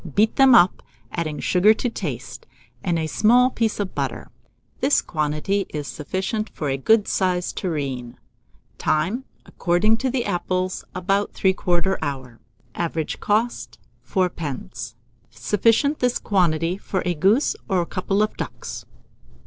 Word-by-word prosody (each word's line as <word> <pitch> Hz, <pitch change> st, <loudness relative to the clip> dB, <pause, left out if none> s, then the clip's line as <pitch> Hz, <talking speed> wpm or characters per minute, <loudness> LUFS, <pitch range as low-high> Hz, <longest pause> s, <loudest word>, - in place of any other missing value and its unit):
Beat 220 Hz, +2 st, +3 dB
them 270 Hz, -2 st, +7 dB
up, 185 Hz, -5 st, +5 dB, 0.3 s
adding 155 Hz, -3 st, -3 dB
sugar 205 Hz, +4 st, +4 dB
to 245 Hz, -, -2 dB
taste, 140 Hz, -, -5 dB, 0.4 s
and 170 Hz, -1 st, +1 dB
a 160 Hz, -, -1 dB
small 245 Hz, +9 st, +4 dB
piece 225 Hz, -3 st, -1 dB
of 200 Hz, -2 st, -2 dB
butter -, -, -4 dB, 0.5 s
This 280 Hz, +2 st, +4 dB
quantity 155 Hz, +6 st, -1 dB
is 150 Hz, -1 st, -5 dB
sufficient 190 Hz, +7 st, -3 dB
for 150 Hz, -, -4 dB
a 135 Hz, -, 0 dB
good 210 Hz, +9 st, +3 dB
sized 180 Hz, -2 st, 0 dB
tureen. 135 Hz, -8 st, -3 dB, 0.6 s
Time. 185 Hz, +12 st, 0 dB, 0.2 s
According 190 Hz, +6 st, +2 dB
to 260 Hz, +2 st, -1 dB
the 250 Hz, -1 st, -1 dB
apples, 185 Hz, -1 st, -1 dB
about 195 Hz, +2 st, 0 dB
3/4 190 Hz, -1 st, +1 dB
hour. 130 Hz, -5 st, -5 dB, 0.3 s
Average 165 Hz, -2 st, -3 dB
cost, 225 Hz, +4 st, -1 dB, 0.3 s
4d. 140 Hz, -, -3 dB, 0.3 s
Sufficient, 225 Hz, -, +2 dB
this 250 Hz, -1 st, +2 dB
quantity, 175 Hz, -2 st, +1 dB
for 190 Hz, -, -2 dB
a 180 Hz, -, +1 dB
goose 195 Hz, -, +3 dB
or 180 Hz, -3 st, +2 dB
couple 195 Hz, +3 st, 0 dB
of 215 Hz, -, -2 dB
ducks. -, -, -6 dB
185 Hz, 135 wpm, -23 LUFS, 155-215 Hz, 0.6 s, them